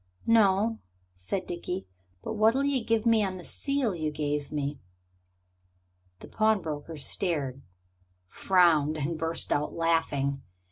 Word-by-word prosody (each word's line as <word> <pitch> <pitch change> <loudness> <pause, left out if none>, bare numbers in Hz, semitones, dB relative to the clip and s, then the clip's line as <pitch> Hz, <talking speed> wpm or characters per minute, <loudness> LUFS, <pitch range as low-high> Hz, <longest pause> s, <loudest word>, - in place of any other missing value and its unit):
"No," 220 0 +3 0.4
said 90 - -4
Dickie, 180 +2 -4 0.4
"but - - -4
what'll 220 +5 +3
you 280 -4 +1
give 225 0 0
me 225 -2 +4
on 190 -2 -3
the 180 - -10
seal 275 -3 -1
you 155 -3 -2
gave 145 -1 -3
me?" 145 -1 -3 1.4
The - - -10
pawnbroker 165 -8 -1
stared, 140 -3 -2 0.6
frowned, 160 - +3
and 155 +3 -2
burst 165 +1 +1
out 145 +1 -1
laughing. 155 -5 0
170 Hz, 125 wpm, -28 LUFS, 150-215 Hz, 1.4 s, me